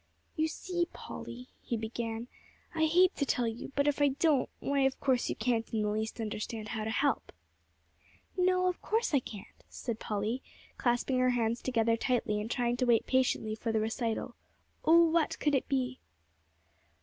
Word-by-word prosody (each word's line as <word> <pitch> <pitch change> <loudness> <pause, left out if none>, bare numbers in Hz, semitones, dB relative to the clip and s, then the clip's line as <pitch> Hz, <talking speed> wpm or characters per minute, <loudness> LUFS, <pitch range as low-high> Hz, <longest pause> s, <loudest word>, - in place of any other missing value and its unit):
"You 315 0 +2
see, 350 +2 -2
Polly," 250 +2 -8
he 235 - -2
began, 225 +1 -4 0.5
"I 320 -1 +2
hate 360 +4 +4
to - - +1
tell 250 -3 +1
you, 225 +4 -5
but 280 +1 +2
if 290 0 +1
I 290 - +6
don't, 285 0 +2
why 280 0 0
of 270 -1 +2
course 260 -3 +1
you - - -1
can't 230 0 0
in 220 -2 0
the 210 - +1
least 220 +2 -3
understand 215 0 -4
how 220 -2 -3
to - - -2
help." 280 +6 0 1.0
"No, 365 0 +3
of 360 - -1
course 450 -5 0
I 280 - +5
can't," 210 -5 -11
said 235 -3 -4
Polly, 215 +5 -2 0.3
clasping 245 +1 +1
her 255 0 +4
hands 235 -1 0
together 230 -3 +2
tightly, 225 -4 0
and 215 - -5
trying 240 -1 0
to 255 - +1
wait 235 -2 +4
patiently 255 -4 +1
for 225 +1 -2
the 220 - +1
recital. 225 +1 -2 0.5
Oh, 335 +1 +7
what 325 -1 +1
could 295 - +1
it 270 - +1
be! 260 -2 -1
245 Hz, 180 wpm, -31 LUFS, 225-285 Hz, 1.0 s, Oh